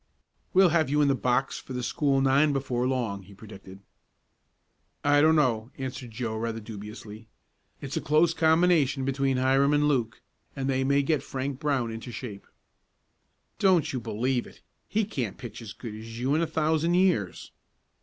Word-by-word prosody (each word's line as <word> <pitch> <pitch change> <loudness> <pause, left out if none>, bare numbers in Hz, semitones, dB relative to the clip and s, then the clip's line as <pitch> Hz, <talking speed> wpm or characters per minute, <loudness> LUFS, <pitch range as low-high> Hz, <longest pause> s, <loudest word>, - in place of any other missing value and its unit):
"We'll 190 -1 +5
have 160 -3 +2
you 150 +1 +3
in 140 - +3
the - - +4
box 125 +1 0
for 130 - -9
the 125 -1 -3
school 135 +1 +1
nine 140 +2 +3
before 130 -2 -1
long," 120 -7 -2
he 100 +1 -15
predicted. 95 -2 -12 1.2
"I 145 0 +4
don't 160 +1 +5
know," 120 -6 +1
answered 130 -2 -6
Joe 115 -1 -4
rather 115 0 -3
dubiously. 105 0 -9 0.5
"It's 140 0 -5
a - - -1
close 155 +3 +3
combination 160 -4 +3
between 135 -1 0
Hiram 135 +2 +3
and 150 0 +3
Luke, 120 -7 -1 0.3
and 135 -1 -3
they 135 -1 +1
may 140 +1 +2
get 150 0 +1
Frank 135 0 -4
Brown 135 -6 0
into 115 +2 -7
shape." 105 -3 -8 1.1
"Don't 185 -8 +3
you 130 - -1
believe 120 +3 -1
it. - - -17 0.3
He 215 0 +1
can't 125 - -4
pitch 120 -3 -9
as 110 -3 -8
good 110 0 -8
as 115 +1 -9
you 130 +3 0
in 155 - +2
a 165 - 0
thousand 160 +2 +1
years." 180 - +1
130 Hz, 175 wpm, -27 LUFS, 115-150 Hz, 1.2 s, We'll